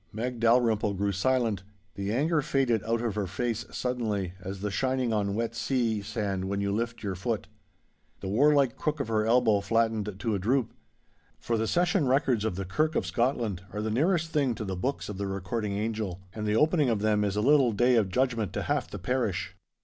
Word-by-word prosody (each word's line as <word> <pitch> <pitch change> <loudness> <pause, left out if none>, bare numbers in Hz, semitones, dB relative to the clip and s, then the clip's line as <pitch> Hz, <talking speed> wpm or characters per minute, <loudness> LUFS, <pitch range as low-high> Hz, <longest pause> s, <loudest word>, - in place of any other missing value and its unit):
Meg 120 +3 -4
Dalrymple 115 -3 +3
grew 100 +1 0
silent. 115 0 +1 0.3
The 100 0 -3
anger 150 +6 +2
faded 130 -6 +1
out 115 +1 0
of 115 -3 -1
her 105 -2 -2
face 115 +4 -2
suddenly 110 -7 -2
as 95 +1 -6
the 105 0 -2
shining 130 +1 0
on 100 -2 0
wet 115 +1 -1
sea 115 -3 0
sand 100 -3 -3
when 100 +1 -2
you 100 0 0
lift 115 +3 -2
your 100 -2 -2
foot. 110 +4 -2 0.7
The - - -6
warlike 140 +4 +3
crook 155 0 -1
of 140 - -3
her 110 -1 +1
elbow 115 -3 +4
flattened 110 -2 0
to 110 +2 -1
a 100 - 0
droop. 115 +4 0 0.6
For 115 - -2
the 110 0 0
Session 175 - +2
records 130 -4 +2
of 110 -5 -1
the 95 +1 -4
Kirk 155 - 0
of - - +1
Scotland 120 -6 0
are 105 - -3
the 110 - -1
nearest 165 - +1
thing 140 -5 +1
to 110 - -5
the 95 -1 -3
Books 130 +10 -2
of 105 -2 -6
the 100 - -2
Recording 100 +2 -3
Angel, 105 -3 -2
and 105 -1 -4
the 105 - +1
opening 150 +1 +3
of 110 -3 0
them 105 -1 +2
is 100 -1 -1
a 105 - +1
little 135 0 +5
Day 120 +4 +3
of 110 -5 +3
Judgment 115 -2 0
to - - -2
half - - -1
the - - -6
parish. 100 -7 -2
110 Hz, 210 wpm, -28 LUFS, 100-125 Hz, 0.7 s, little